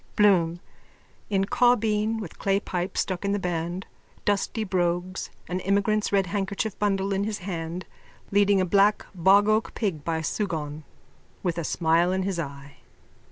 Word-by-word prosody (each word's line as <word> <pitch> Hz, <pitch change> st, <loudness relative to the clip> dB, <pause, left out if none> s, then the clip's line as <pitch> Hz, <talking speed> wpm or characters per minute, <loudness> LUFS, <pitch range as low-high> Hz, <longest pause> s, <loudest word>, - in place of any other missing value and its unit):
BLOOM: 175 Hz, -5 st, +4 dB, 0.7 s
_(In 195 Hz, -2 st, +2 dB
caubeen 225 Hz, -2 st, +2 dB
with 200 Hz, -7 st, -8 dB
clay 195 Hz, 0 st, +2 dB
pipe 185 Hz, -1 st, -3 dB
stuck 185 Hz, 0 st, -1 dB
in 200 Hz, 0 st, 0 dB
the -, -, +1 dB
band, 175 Hz, 0 st, -3 dB, 0.4 s
dusty 205 Hz, +2 st, 0 dB
brogues, 180 Hz, -1 st, -1 dB, 0.2 s
an 180 Hz, +1 st, -2 dB
emigrant's 200 Hz, +2 st, +1 dB
red 195 Hz, -1 st, +3 dB
handkerchief 200 Hz, +2 st, -2 dB
bundle 195 Hz, -1 st, +1 dB
in 195 Hz, +1 st, 0 dB
his 210 Hz, 0 st, -2 dB
hand, 175 Hz, -1 st, -5 dB, 0.5 s
leading 200 Hz, -1 st, +4 dB
a 185 Hz, -, +2 dB
black 200 Hz, +3 st, +3 dB
bogoak 205 Hz, +4 st, +3 dB
pig 185 Hz, -10 st, -2 dB
by 165 Hz, +1 st, -1 dB
a 160 Hz, -, -3 dB
sugaun, 155 Hz, -6 st, -3 dB, 0.6 s
with 175 Hz, -2 st, -1 dB
a -, -, -2 dB
smile 165 Hz, +3 st, +2 dB
in 190 Hz, 0 st, 0 dB
his 190 Hz, -2 st, -2 dB
eye.) 140 Hz, -2 st, -7 dB
190 Hz, 155 wpm, -26 LUFS, 175-205 Hz, 0.7 s, BLOOM